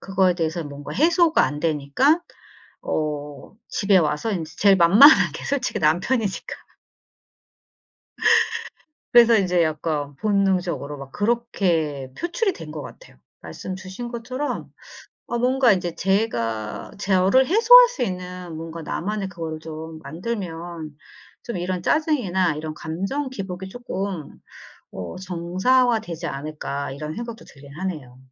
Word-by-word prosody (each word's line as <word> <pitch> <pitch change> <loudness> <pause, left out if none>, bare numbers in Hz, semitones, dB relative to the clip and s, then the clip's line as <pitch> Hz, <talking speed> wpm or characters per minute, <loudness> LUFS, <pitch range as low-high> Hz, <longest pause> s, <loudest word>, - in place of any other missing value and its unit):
그거에 190 -2 +2
대해서 165 0 -2
뭔가 145 -1 -8
해소가 330 +2 +4
안 145 0 -3
되니까 160 - +2 0.6
어 150 0 -4
집에 200 -2 +2
와서 155 +5 0
이제 165 -5 -4
제일 200 -1 +5
만만한 200 - +7
게 - - -8
솔직히 275 -3 -1
남편이니까. 190 +7 0 2.6
그래서 235 -2 +7
이제 180 -3 +2
약간 155 -2 -2
본능적으로 185 -5 0
막 135 -1 -10
그렇게 175 - -1
표출이 390 +4 -1
된 - - -9
것 - - -6
같아요. - - -13 0.2
말씀 190 - -7
주신 190 +5 -7
것처럼 255 +4 -4 0.6
어 240 - -2
뭔가 250 -1 +4
인제 180 -3 -1
'제가 115 - -1
제어를 195 +6 +3
해소할 480 - +8
수 - - -5
있는 180 -2 -5
뭔가 165 +1 -7
나만의 195 +5 -3
그거를 165 -3 -6
좀 160 0 -8
만들면 170 -3 -6 0.5
좀 235 - -4
이런 180 0 -3
짜증이나 190 - +1
이런 155 0 -5
감정 195 - -3
기복이 190 -5 -6
쪼끔 195 - -5 0.5
어 90 -3 -6
정상화되지 185 +2 0
않을까.' 140 -1 -5
이런 150 +3 -6
생각도 235 0 -7
들긴 140 0 -15
하네요. 155 -9 -6
185 Hz, 275 characters per minute, -23 LUFS, 155-230 Hz, 2.6 s, 해소할